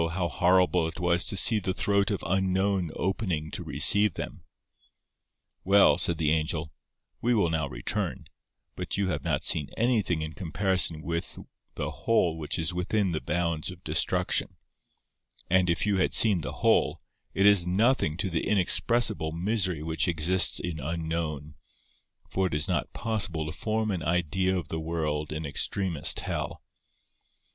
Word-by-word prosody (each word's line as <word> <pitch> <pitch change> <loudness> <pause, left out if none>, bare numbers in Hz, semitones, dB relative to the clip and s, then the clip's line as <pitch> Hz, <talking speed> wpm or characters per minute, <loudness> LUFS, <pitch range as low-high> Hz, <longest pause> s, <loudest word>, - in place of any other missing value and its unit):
how 90 -1 -1
horrible 90 0 +2
it 80 - -8
was 85 0 +1
to 100 - 0
see 110 +3 +6
the 95 -1 -3
throat 100 0 +1
of 100 -4 -3
Unknown 95 0 0
opening 90 -5 -3
to 90 - -5
receive 85 +6 +5
them! - - -7 1.2
"Well!" 100 +1 +4
said 85 - 0
the 75 -2 0
Angel, 80 -1 -2 0.5
"we 120 +1 +1
will 85 -6 +1
now 80 -3 -2
return; - - -4 0.5
but 90 0 -5
you 100 -2 0
have 80 - -3
not - - -1
seen 75 - +2
anything 110 -9 0
in 80 0 -6
comparison 90 -2 -1
with 85 0 -4 0.4
the - - -4
whole 90 -8 0
which 80 -2 -4
is 85 +2 -2
within 95 +2 -1
the 80 - -3
bounds 85 0 -2
of 90 -1 -11
Destruction, - - 0 0.9
and 95 -1 +3
if 85 - 0
you 105 -2 +1
had 95 - +1
seen 100 -6 +6
the 65 - -5
whole, - - +2 0.4
it 100 - +2
is 100 -4 +5
nothing 95 - +1
to 95 +1 -3
the 80 - -2
inexpressible 105 -2 +2
misery 90 -2 -1
which 80 +2 -1
exists 90 +2 +3
in 85 -3 -5
Unknown, 80 -1 -4 0.7
for 95 0 -1
it 80 - -4
is 75 - 0
not - - -2
possible 100 -8 -1
to 75 - -5
form 110 +1 -2
an 90 -3 -3
idea 90 +3 0
of 90 - -6
the 80 - -3
world 80 -2 -3
in 75 +1 -5
extremest 85 +3 +1
hell." - - -4
90 Hz, 160 wpm, -27 LUFS, 80-95 Hz, 1.2 s, see